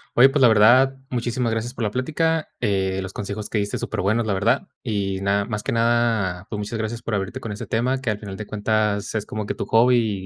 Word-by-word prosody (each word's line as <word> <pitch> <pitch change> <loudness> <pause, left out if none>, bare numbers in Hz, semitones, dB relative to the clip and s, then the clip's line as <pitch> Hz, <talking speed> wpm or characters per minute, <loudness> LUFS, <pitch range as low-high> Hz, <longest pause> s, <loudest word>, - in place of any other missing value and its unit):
Oye, 130 +3 +8
pues, 140 +1 0
la 125 - +8
verdad, 120 +5 +5 0.2
muchísimas 120 -1 -1
gracias 115 +3 -3
por 120 - -3
la 105 - 0
plática. 160 +6 0
Eh, 95 -2 0
los 95 0 -7
consejos 105 +1 -5
que 105 - 0
diste, 100 0 -2
superbuenos, 110 +5 -1
la 105 - 0
verdad, 95 - +1
y 100 -3 -2
nada, 100 +1 +1
más 105 -1 -3
que - - -2
nada, 115 -6 +1
pues, 105 - -4
muchas 105 +2 -4
gracias 110 +1 -4
por 115 - -4
abrirte 100 +5 -2
con 115 -4 -6
ese 105 - -6
tema, 130 +4 0
que, 125 - -2
al 105 - 0
final 100 -3 -7
de 105 - -7
cuentas, 105 -1 0
es 110 -2 -2
como 105 -1 -4
que - - -2
tu - - -4
hobby 115 -4 +3
110 Hz, 235 wpm, -23 LUFS, 100-120 Hz, 0.2 s, Oye